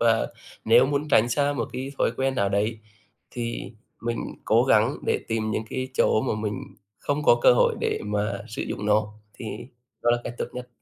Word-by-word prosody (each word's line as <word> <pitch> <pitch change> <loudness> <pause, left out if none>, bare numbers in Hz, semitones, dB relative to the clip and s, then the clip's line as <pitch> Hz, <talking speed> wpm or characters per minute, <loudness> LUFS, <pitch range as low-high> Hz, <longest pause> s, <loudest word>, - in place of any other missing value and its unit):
và 115 -1 +3 0.4
nếu 130 - +6
muốn 145 +2 -1
tránh 120 -5 +4
xa 145 +4 +1
một 120 -5 -2
cái 130 +2 -5
thói - - +3
quen 135 0 0
nào 100 -5 +1
đấy, 105 +3 0 0.5
thì 120 -1 -4 0.3
mình 115 0 -2 0.3
cố 115 +3 +4
gắng 120 +1 +3
để - - +2
tìm 110 -1 -1
những 110 - -1
cái 130 0 -3
chỗ 110 - +3
mà - - 0
mình 105 -2 -3 0.4
không 145 +1 -1
có 120 - +5
cơ - - +8
hội 120 - +3
để - - 0
mà 105 0 -1
sử - - -4
dụng 105 - -4
nó 105 0 +2 0.2
thì 115 - -8 0.6
đó 120 - +4
là 120 - +3
cách 120 - -5
tốt - - 0
nhất. 125 0 -7
120 Hz, 205 wpm, -25 LUFS, 110-130 Hz, 0.6 s, cơ